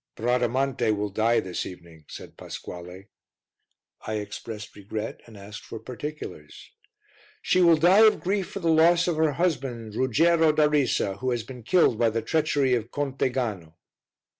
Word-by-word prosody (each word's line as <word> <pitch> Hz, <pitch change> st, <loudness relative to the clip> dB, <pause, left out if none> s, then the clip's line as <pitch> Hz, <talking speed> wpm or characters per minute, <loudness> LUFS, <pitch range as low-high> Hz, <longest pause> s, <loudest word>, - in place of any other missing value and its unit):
"Bradamante 125 Hz, +2 st, 0 dB
will 105 Hz, 0 st, -3 dB
die 115 Hz, +4 st, +2 dB
this 90 Hz, -1 st, -4 dB
evening," 85 Hz, -4 st, -12 dB
said -, -, -10 dB
Pasquale. 90 Hz, +3 st, -9 dB, 1.0 s
I 110 Hz, -, -2 dB
expressed 105 Hz, +1 st, -7 dB
regret, 105 Hz, +2 st, -6 dB
and 110 Hz, -2 st, -13 dB
asked 100 Hz, +2 st, -10 dB
for -, -, -8 dB
particulars. 125 Hz, -, -8 dB, 0.7 s
"She 185 Hz, -, +2 dB
will 170 Hz, -2 st, +6 dB
die 190 Hz, +7 st, +6 dB
of 215 Hz, -, +2 dB
grief 195 Hz, 0 st, -2 dB
for 195 Hz, -, -7 dB
the 165 Hz, -1 st, +2 dB
loss 170 Hz, +2 st, +4 dB
of 170 Hz, -3 st, 0 dB
her 155 Hz, -2 st, +2 dB
husband, 135 Hz, -9 st, -2 dB
Ruggiero 160 Hz, +7 st, +3 dB
da 155 Hz, -1 st, +4 dB
Risa, 135 Hz, -9 st, 0 dB
who 130 Hz, -, -2 dB
has 120 Hz, -2 st, -1 dB
been 125 Hz, +1 st, -10 dB
killed 125 Hz, -2 st, +2 dB
by 115 Hz, -, +4 dB
the 110 Hz, 0 st, -3 dB
treachery 145 Hz, -2 st, +1 dB
of 115 Hz, -2 st, -1 dB
Conte 135 Hz, -1 st, -1 dB
Gano." 105 Hz, -11 st, -4 dB
125 Hz, 160 wpm, -25 LUFS, 105-155 Hz, 1.0 s, will